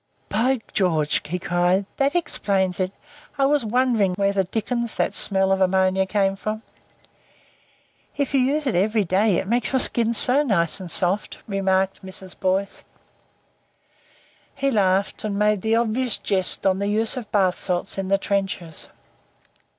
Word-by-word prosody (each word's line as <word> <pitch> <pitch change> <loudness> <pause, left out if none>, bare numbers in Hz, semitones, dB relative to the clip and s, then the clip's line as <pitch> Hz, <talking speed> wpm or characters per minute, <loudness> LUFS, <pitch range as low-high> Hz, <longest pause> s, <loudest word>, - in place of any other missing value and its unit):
"By 250 +3 +1
George!" 160 -7 +1
he 175 +4 -2
cried. 180 +1 +1
"That 275 +4 +1
explains 195 - 0
it. 185 0 -1 0.5
I 275 - +3
was 290 -1 +2
wondering 225 -5 +1
where 200 +1 +1
the 195 -1 +1
Dickens 235 +4 -3
that - - 0
smell 190 -1 +2
of 190 0 +1
ammonia 190 0 +2
came 195 -1 +1
from." 215 +3 -5 1.5
"If 280 -2 -1
you 275 - +4
use 285 +4 +1
it 260 - 0
every 210 +4 +2
day 190 +1 +2
it - - -3
makes 235 +2 0
your 265 - +2
skin 235 -2 0
so 255 +6 +4
nice 195 - 0
and 185 -2 -8
soft," 185 +5 +1
remarked 195 -1 0
Mrs. 190 0 -5
Boyce. 190 +1 -1 1.7
He 275 0 0
laughed, 195 -3 +1
and 205 -2 -2
made 210 -1 +2
the 220 +2 +1
obvious 235 +1 +1
jest 190 -2 0
on 190 0 +2
the 200 - -1
use 215 +2 -1
of 245 -5 -7
bath 190 -3 +2
salts 180 +1 -1
in 190 - -3
the 195 +1 +3
trenches. 195 -5 -3
200 Hz, 160 wpm, -22 LUFS, 190-230 Hz, 1.7 s, you